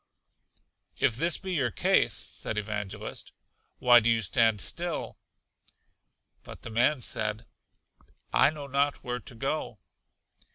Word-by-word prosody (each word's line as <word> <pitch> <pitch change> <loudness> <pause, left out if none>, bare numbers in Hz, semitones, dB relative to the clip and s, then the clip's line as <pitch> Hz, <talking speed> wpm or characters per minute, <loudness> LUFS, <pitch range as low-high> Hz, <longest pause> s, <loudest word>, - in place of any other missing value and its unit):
If 110 - +2
this 165 +6 +2
be 190 -1 -5
your 135 -8 +1
case, 100 - +2
said 110 - -2
Evangelist, 105 0 -5 0.5
why 120 -1 +7
do 115 0 +1
you 115 -1 +2
stand 110 +2 +3
still? 170 - -2 1.2
But - - -11
the 120 - -7
man 125 +5 +2
said, 110 -1 -1 0.9
I - - +5
know 150 -2 -7
not 140 +1 0
where 125 0 -3
to 115 - -12
go. 135 -1 -3
120 Hz, 125 wpm, -28 LUFS, 110-145 Hz, 1.2 s, why